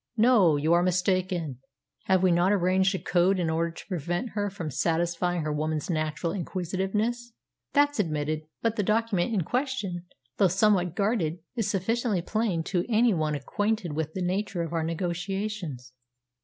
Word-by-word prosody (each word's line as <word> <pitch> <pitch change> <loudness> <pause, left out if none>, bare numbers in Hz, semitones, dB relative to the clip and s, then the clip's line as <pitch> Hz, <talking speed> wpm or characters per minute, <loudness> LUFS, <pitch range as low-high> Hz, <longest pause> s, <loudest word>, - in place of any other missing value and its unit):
"No; 215 -8 +5
you 155 +3 +2
are 170 - +5
mistaken. 180 -5 0 0.5
Have 190 -1 +3
we 185 - +5
not 175 +3 +3
arranged 190 0 +2
a - - 0
code 185 +1 +2
in 170 -3 0
order 165 +1 0
to 165 - -11
prevent 175 - -2
her 205 -2 -2
from 175 -6 -5
satisfying 170 +4 0
her 150 -1 -1
woman's 155 +2 -2
natural 155 +1 -1
inquisitiveness?" 200 +6 -2 0.4
"That's 290 -3 +3
admitted. 155 -3 -1 0.2
But 230 0 +1
the - - +2
document 215 -1 +1
in 200 -6 +1
question, 215 - -2 0.3
though 195 - +5
somewhat 185 -2 +2
guarded, 200 -6 0 0.2
is 225 -4 -1
sufficiently 210 -1 0
plain 205 -5 0
to 175 0 0
any 230 0 +4
one 155 -3 0
acquainted 205 +4 -1
with 160 0 -3
the 185 - -2
nature 185 -1 -1
of 165 0 -5
our 165 - 0
negotiations." 175 - -3
180 Hz, 160 wpm, -27 LUFS, 165-205 Hz, 0.5 s, No